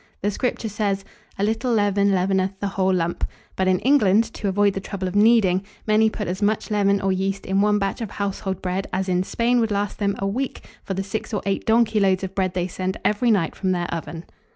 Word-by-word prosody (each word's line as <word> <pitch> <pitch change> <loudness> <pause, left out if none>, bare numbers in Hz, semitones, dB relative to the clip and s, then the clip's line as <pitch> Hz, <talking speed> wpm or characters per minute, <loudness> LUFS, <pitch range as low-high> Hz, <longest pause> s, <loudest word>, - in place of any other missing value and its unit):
The 205 - +1
Scripture 240 +1 -2
says, 200 -2 -2 0.3
"A 195 - -1
little 225 +4 0
leaven 205 -2 +2
leaveneth 190 0 0
the 200 - -2
whole 190 -1 +1
lump;" 170 -2 -1 0.3
but 190 - 0
in 185 -1 +4
England, 225 -6 +4
to 205 - -4
avoid 200 +1 +2
the 195 - -3
trouble 195 -1 -4
of 185 - -5
kneading, 205 -4 +4 0.2
many 220 +1 +4
put 210 -1 -5
as 185 +3 -3
much 215 +1 0
leaven 200 -1 +2
or 195 0 0
yeast 195 +1 -2
in 195 +1 +1
one 210 0 +3
batch 195 +2 -2
of 225 - -3
household 195 -2 -3
bread 185 +1 -2
as 190 +1 -1
in 180 -1 +1
Spain 235 +5 +1
would 225 -1 +1
last 205 0 -2
them 200 -1 0
a 195 - -3
week 250 +7 -3 0.2
for 195 - -4
the 195 - -2
six 210 +2 -4
or 205 - -2
eight 195 -1 -2
donkey 225 -1 +3
loads 190 -1 +2
of 190 0 -4
bread 185 -1 -1
they 180 -1 0
send 185 +1 -3
every 210 +4 +2
night 190 -8 +1
from 185 -1 0
their 175 -1 -1
oven. 165 0 -6
195 Hz, 230 wpm, -23 LUFS, 190-210 Hz, 0.3 s, in